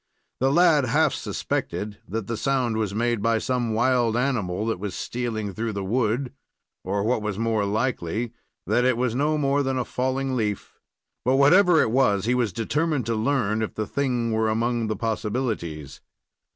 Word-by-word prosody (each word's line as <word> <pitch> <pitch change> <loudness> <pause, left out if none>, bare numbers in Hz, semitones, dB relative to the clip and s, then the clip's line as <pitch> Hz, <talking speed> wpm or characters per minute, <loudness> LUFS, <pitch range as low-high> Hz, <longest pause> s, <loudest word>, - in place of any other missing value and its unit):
The 135 +1 +2
lad 160 -3 +5
half 150 +5 +2
suspected 105 0 -3
that 110 +1 -3
the 115 - -3
sound 125 -2 0
was 110 -3 -1
made 120 -1 0
by 115 +1 +2
some 120 0 -1
wild 120 -1 +2
animal 110 -7 -1
that 115 -5 -1
was 100 -2 -4
stealing 110 -4 -3
through 110 +2 -3
the 100 -1 -3
wood, 120 +5 0 0.5
or 100 +2 -1
what 115 +1 +1
was 105 -2 -3
more 110 -2 0
likely, 110 0 -1 0.3
that 125 - +2
it 125 -1 +2
was 125 -2 0
no 150 +4 +1
more 140 -1 +1
than 135 -1 -1
a 125 - -1
falling 130 +1 -1
leaf; 105 -4 -3 0.4
but, 130 +2 +2
whatever 170 +5 +6
it 110 - -1
was, 105 -6 +2
he 120 - +2
was 120 -4 +1
determined 145 - -1
to 115 0 -1
learn 110 -2 0
if 110 - -3
the 110 - -2
thing 125 -2 -1
were 110 0 +1
among 115 +1 0
the 110 - -1
possibilities. 105 - -3
115 Hz, 180 wpm, -24 LUFS, 110-130 Hz, 0.5 s, whatever